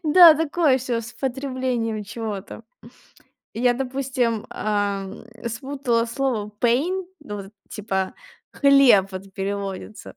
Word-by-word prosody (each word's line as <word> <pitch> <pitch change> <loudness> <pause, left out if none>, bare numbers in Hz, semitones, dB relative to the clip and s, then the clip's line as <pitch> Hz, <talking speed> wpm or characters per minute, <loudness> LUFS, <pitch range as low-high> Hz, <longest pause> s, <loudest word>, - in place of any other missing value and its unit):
Да, 330 +1 +9
такое 310 -3 +2
всё 245 -2 -2
с 230 +1 -9
потреблением 255 -4 -2
чего-то. 210 -2 -6 0.9
Я, 245 +2 +2
допустим, 255 -3 -1
ам, 200 -2 -2 0.2
спутала 240 -1 -1
слово 235 -4 -2
pain, 315 +11 +1 0.2
ну, 210 -8 -7
вот 200 - -7
это, 200 - -19 0.2
типа, 190 -3 -2 0.4
хлеб, 275 -9 +5
вот, 190 +1 -8
переводится. 200 +1 -4
235 Hz, 110 wpm, -23 LUFS, 205-270 Hz, 0.9 s, Да